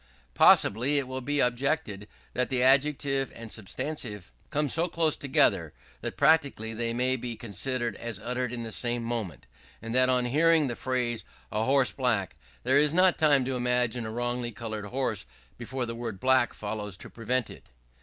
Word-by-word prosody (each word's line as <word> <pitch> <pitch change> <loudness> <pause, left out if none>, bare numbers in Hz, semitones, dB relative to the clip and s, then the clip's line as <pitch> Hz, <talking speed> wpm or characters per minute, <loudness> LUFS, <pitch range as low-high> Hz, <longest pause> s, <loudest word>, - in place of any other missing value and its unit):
Possibly 125 +8 +5
it 140 -2 0
will 130 0 -5
be 145 +2 0
objected 120 -5 -1 0.3
that 125 0 0
the 130 -2 +1
adjective 135 0 +2
and 115 -1 -9
substantive 110 - -5 0.2
come 150 0 0
so 165 +5 0
close 165 -3 +1
together, 140 -2 +2 0.3
that - - -5
practically 140 -8 +2
they 115 +1 -2
may 125 +2 +1
be 120 -2 -5
considered 120 +1 -3
as 115 -3 -5
uttered 125 +2 -3
at 120 -1 -5
the 115 - -6
same 120 0 0
moment; 115 - -4 0.3
and 115 +1 -6
that 130 0 +4
on 125 -1 +2
hearing 155 +4 +3
the 120 -3 -3
phrase, 125 -3 -1 0.3
"a 110 +1 0
horse 135 0 +3
black," 115 -8 -1 0.3
there 130 +3 +3
is 150 +1 +3
not 185 0 +4
time 145 -4 +4
to 130 0 -2
imagine 125 -2 0
a - - -5
wrongly 120 +1 -2
coloured 110 -1 -6
horse 120 -2 -2 0.3
before 125 +1 -4
the 115 - -5
word 115 -4 -6
"black" 130 -2 +3
follows 105 -2 -5
to - - -10
prevent 120 +1 -2
it. - - -14
125 Hz, 175 wpm, -28 LUFS, 115-135 Hz, 0.3 s, Possibly